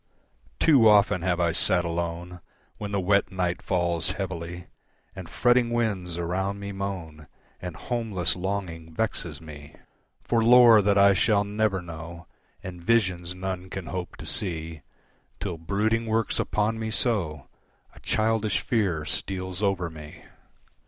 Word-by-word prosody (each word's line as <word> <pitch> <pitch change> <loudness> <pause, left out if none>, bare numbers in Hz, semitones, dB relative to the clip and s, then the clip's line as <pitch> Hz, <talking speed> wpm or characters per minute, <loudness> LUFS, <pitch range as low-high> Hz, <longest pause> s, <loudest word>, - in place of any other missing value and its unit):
Too 130 -8 +6
often 100 -4 +4
have 90 0 0
I 85 -1 +2
sat 90 +1 +3
alone 85 +1 -4 0.4
When 105 -1 -5
the 100 - 0
wet 100 +2 +2
night 90 -2 -1
falls 85 -2 0
heavily, 85 -2 -5 0.5
And - - -8
fretting 120 -1 +3
winds 100 -8 -1
around 95 +4 -2
me 100 0 -5
moan, 90 -6 -6 0.3
And 90 -3 -6
homeless 105 -4 -1
longing 90 -4 -4
vexes 85 -8 -3
me 75 -2 -12 0.5
For 115 -1 +1
lore 120 -2 +8
that 100 0 +2
I 100 0 +6
shall 100 +1 +2
never 105 -2 -1
know, 85 0 -9 0.4
And 90 -2 -8
visions 90 -4 +1
none 95 0 -5
can 95 -1 -6
hope 90 +1 -5
to - - -9
see, 80 -4 -3 0.6
Till 90 -5 -4
brooding 110 +6 0
works 110 0 0
upon 110 +1 0
me 110 0 -3
so 95 - 0 0.5
A - - -15
childish 110 -1 0
fear 95 - 0
steals 95 +2 -3
over 95 -4 0
me. 75 -2 -11
95 Hz, 140 wpm, -26 LUFS, 85-105 Hz, 0.6 s, lore